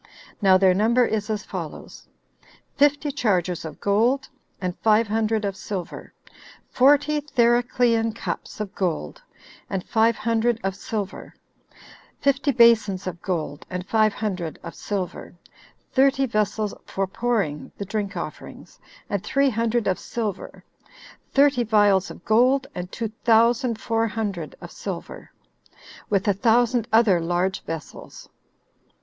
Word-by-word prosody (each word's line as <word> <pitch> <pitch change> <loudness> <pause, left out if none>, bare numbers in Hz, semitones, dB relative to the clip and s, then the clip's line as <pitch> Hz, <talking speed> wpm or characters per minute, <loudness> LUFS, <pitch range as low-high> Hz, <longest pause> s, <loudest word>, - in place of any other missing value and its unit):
Now 190 -2 +6
their 185 -1 +4
number 230 +6 +3
is 215 -1 -2
as 210 -1 -2
follows: - - -8 0.7
Fifty 290 +1 +2
chargers 185 - 0
of 155 -2 -8
gold, 235 +7 +1 0.3
and 180 -2 -3
five 220 +1 +3
hundred 220 0 0
of 195 -1 -2
silver; 190 -4 -6 0.6
forty 290 +3 +4
Thericlean 240 -3 +2
cups - - -5
of 210 -3 -5
gold, 185 - -3 0.5
and 190 -2 -4
five 225 0 +3
hundred 230 +1 0
of 195 -1 -1
silver; 205 -1 -5 0.8
fifty 280 +1 +2
basons 225 -6 +4
of 175 -2 -5
gold, 160 -6 -3
and 180 0 -5
five 215 -1 +3
hundred 185 -7 -4
of 170 - -7
silver; 190 -3 -5 0.6
thirty 270 +1 +3
vessels 215 -2 -1
for 195 - -1
pouring 195 -7 -2
[the 200 - -5
drink 205 0 -3
offerings], - - -8 0.3
and 200 -2 -2
three 275 -1 +2
hundred 230 0 0
of 185 - 0
silver; 215 -5 -5 0.7
thirty 280 -3 +4
vials 205 -4 +3
of - - -12
gold, 255 +5 +3
and 180 0 -6
two 230 -2 -3
thousand 230 +1 +3
four 225 0 0
hundred 200 -8 -4
of - - -9
silver; - - -7 0.8
with 200 +1 +1
a 205 - +4
thousand 235 +2 +2
other 220 -5 +4
large 175 +3 -1
vessels. 165 -2 -8
215 Hz, 130 wpm, -23 LUFS, 190-240 Hz, 0.8 s, Now